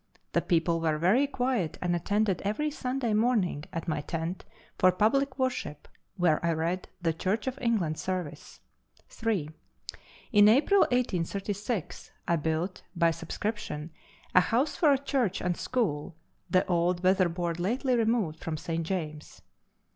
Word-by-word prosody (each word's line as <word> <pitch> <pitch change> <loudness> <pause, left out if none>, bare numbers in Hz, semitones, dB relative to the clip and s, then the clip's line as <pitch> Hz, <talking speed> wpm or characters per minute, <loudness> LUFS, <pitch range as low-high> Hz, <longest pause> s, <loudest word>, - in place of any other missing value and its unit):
The - - +3
people 165 -1 +1
were 160 -2 +1
very 205 - +3
quiet 245 - -1
and 175 -1 0
attended 200 +1 0
every 220 +10 -1
Sunday 250 -4 -2
morning 210 -9 +1
at 165 +1 -5
my 155 -2 -1
tent 165 +4 -4 0.3
for 185 - +6
public 260 +8 +1
worship, 255 - -2 0.3
where 170 -4 +2
I 170 0 +2
read 170 +3 -2 0.2
the 165 -1 +2
Church 195 +6 -1
of 260 0 -3
England 200 -11 0
service. 185 -5 -5 0.5
3. 205 -10 -2 0.8
In 205 -2 +7
April 295 - +4
1836 205 -2 -2 0.2
I 170 - +3
built, 160 +4 -2
by 170 -1 +3
subscription, 165 -2 -4 0.4
a 185 - +7
house 250 - +1
for 310 -5 +4
a 275 - +4
church 260 -8 0
and 180 -1 -1
school 180 - -2 0.3
the 185 - +3
old 175 0 +1
weatherboard 175 -2 +1
lately 250 +8 +1
removed 220 -9 0
from 160 -1 -3
St. 165 +2 -3
James's. 155 -4 -5
185 Hz, 140 wpm, -29 LUFS, 165-230 Hz, 0.8 s, In